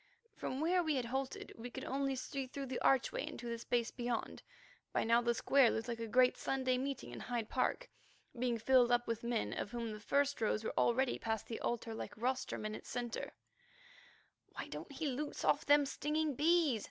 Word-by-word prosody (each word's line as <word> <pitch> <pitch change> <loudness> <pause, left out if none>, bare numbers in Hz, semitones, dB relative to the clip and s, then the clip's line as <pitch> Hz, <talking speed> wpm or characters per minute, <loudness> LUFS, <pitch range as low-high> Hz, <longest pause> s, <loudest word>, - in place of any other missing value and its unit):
From 260 +3 -3
where 355 +3 +3
we 315 -3 +1
had 255 -3 0
halted 265 +2 -3
we 235 +2 -7
could 260 +2 -7
only 275 0 0
see 265 +1 -4
through 275 +2 -5
the 260 -1 -3
archway 270 -2 +2
into 240 - -6
the 235 0 -3
space 235 0 0
beyond. 240 -2 -3 0.5
By - - +2
now 230 +1 +4
the 235 0 +1
square 270 0 +5
looked 225 +2 -2
like 235 -1 -3
a 230 - -3
great 250 +3 +4
Sunday 260 -1 0
meeting 275 0 -4
in - - -7
Hyde 235 -3 -3
Park, - - 0 0.5
being 240 -1 0
filled 245 +1 +4
up 240 0 +3
with 230 -1 -1
men 235 -1 -1
of - - -3
whom 235 -1 -3
the 210 - -6
first 280 +5 +1
rows 215 0 +1
were - - -2
already 250 +2 +2
past 220 -2 -2
the 225 - -5
altar 235 -1 -2
like 220 - -6
rostrum 250 -1 -1
in 215 - -2
its - - -8
centre. 240 -1 -3 1.2
"Why - - -6
don't - - -7
he 280 +3 -4
loose 290 +2 -3
off - - +2
them 290 0 +6
stinging 300 +2 -1
bees?" 305 -3 +3
250 Hz, 200 wpm, -36 LUFS, 235-275 Hz, 1.2 s, them